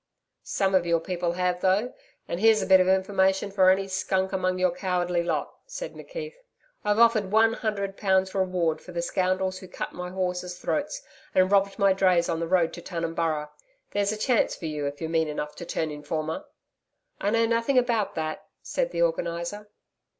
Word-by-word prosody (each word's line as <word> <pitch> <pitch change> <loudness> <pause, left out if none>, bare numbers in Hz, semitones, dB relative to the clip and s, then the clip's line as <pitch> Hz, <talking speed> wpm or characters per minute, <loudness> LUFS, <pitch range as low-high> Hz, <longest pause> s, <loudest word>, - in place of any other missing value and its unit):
'Some 195 -1 0
of 185 -2 +4
your 170 -1 +2
people 175 0 -2
have, 180 0 -1
though, 195 +6 +2 0.3
and 170 - -3
here's 220 +1 +5
a - - -2
bit 190 0 +7
of 185 - +3
information 190 +1 +2
for 190 -2 +5
any 195 +1 +2
skunk 190 0 -1
among 185 -1 0
your 185 -1 +2
cowardly 180 -1 0
lot,' 165 -4 -2
said - - -6
McKeith. 485 -2 -7 0.5
'I've 210 0 +1
offered 225 -4 +4
one 225 +1 +5
hundred 200 -4 -3
pounds 190 -2 +2
reward 180 -4 0
for 180 - -11
the 170 0 -2
scoundrels 185 +1 0
who 185 - -11
cut 180 - -6
my 180 0 -5
horses' 180 -1 -3
throats 300 - -2 0.3
and 185 +1 +4
robbed 200 -1 +3
my 200 -2 +4
drays 185 -3 +3
on 165 -1 -1
the 165 - -2
road 175 -2 +2
to 175 - -8
Tunumburra. 165 -3 -2 0.4
There's 200 0 +1
a 215 - -3
chance 240 +2 +2
for - - -8
you, 150 -2 -2
if 145 0 -6
you're 160 - -3
mean 160 -1 +2
enough 150 0 -4
to 175 - -7
turn 160 -1 -2
informer.' 155 - -4 0.7
'I 200 - 0
know 230 +1 +3
nothing 230 +4 +1
about 235 -4 +1
that,' 155 -1 -4 0.2
said - - -1
the - - 0
Organiser. 205 - -2
185 Hz, 190 wpm, -26 LUFS, 170-205 Hz, 0.7 s, bit